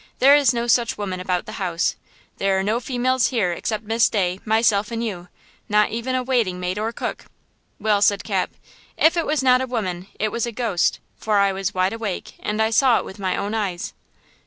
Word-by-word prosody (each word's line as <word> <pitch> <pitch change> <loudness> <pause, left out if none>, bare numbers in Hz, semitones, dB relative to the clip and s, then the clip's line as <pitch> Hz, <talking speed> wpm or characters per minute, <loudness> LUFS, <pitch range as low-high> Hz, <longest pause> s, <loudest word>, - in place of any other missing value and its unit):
there 275 +2 +7
is 285 -4 +4
no 235 -1 -1
such 240 -1 +2
woman 190 -3 -4
about 180 -1 -1
the - - -8
house! 175 -2 0 0.4
There 195 -1 +2
are 190 - 0
no 215 +4 0
females 255 0 +1
here 215 -9 0
except 215 +5 -3
Miss 225 +2 +2
Day, 185 -3 0
myself 220 -2 +2
and 230 0 -3
you–not 210 +2 -2
even 235 +3 -2
a 255 - 0
waiting 235 -8 0
maid 180 +2 -2
or 220 +2 -1
cook." - - -5 0.5
"Well," 210 -1 +2
said 200 -1 +3
Cap, 195 -4 -1 0.5
"if 325 +2 +4
it 335 - 0
was 300 -2 0
not 255 -1 +5
a 260 - -2
woman 190 -7 -3
it 215 0 0
was 235 0 -1
a - - -3
ghost; 220 -6 0 0.2
for 215 -1 0
I 200 -1 +4
was 195 +1 -3
wide 185 +2 +1
awake, 220 -5 -4
and 210 +1 -3
I 220 - 0
saw 245 +1 +4
it - - -3
with 190 - -10
my 190 -2 -1
own 205 +2 -3
eyes!" 195 -6 -3
215 Hz, 210 wpm, -22 LUFS, 190-235 Hz, 0.5 s, there